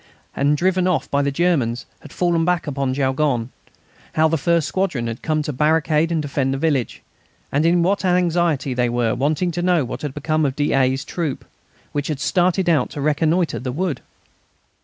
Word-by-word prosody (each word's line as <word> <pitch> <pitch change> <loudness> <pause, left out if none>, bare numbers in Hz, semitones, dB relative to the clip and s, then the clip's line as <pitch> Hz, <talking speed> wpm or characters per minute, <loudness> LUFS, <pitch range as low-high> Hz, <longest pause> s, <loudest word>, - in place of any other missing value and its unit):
and 145 +2 +2
driven 185 +2 +1
off 180 -3 -1
by 140 - +2
the 140 - +1
Germans 140 -7 0
had - - -13
fallen 175 -2 +1
back 175 0 0
upon 135 -3 -2
Jaulgonne; 130 -3 0 0.6
how 160 0 +4
the 160 - +1
first 165 +1 +1
squadron 175 -11 -1
had 115 0 -5
come 155 -1 0
to 150 - -4
barricade 155 +3 +2
and 165 - +1
defend 140 -2 -1
the - - -2
village, 140 -5 -1 0.5
and 150 +4 +2
in 170 0 +3
what 195 +2 +1
anxiety 175 -6 +1
they 125 -1 +1
were 120 -2 0
waiting 155 +6 0
to 175 +1 -3
know 175 -5 +2
what - - -6
had 145 -3 -5
become 155 0 0
of 135 -2 0
d'A.'s 135 -2 +1
troop, 160 -5 -4 0.5
which 145 -1 -2
had 150 -4 -3
started 180 +3 +1
out 155 -7 +2
to - - -7
reconnoitre 155 +4 +1
the 125 0 -4
wood. 160 -1 -2
150 Hz, 185 wpm, -21 LUFS, 135-170 Hz, 0.6 s, how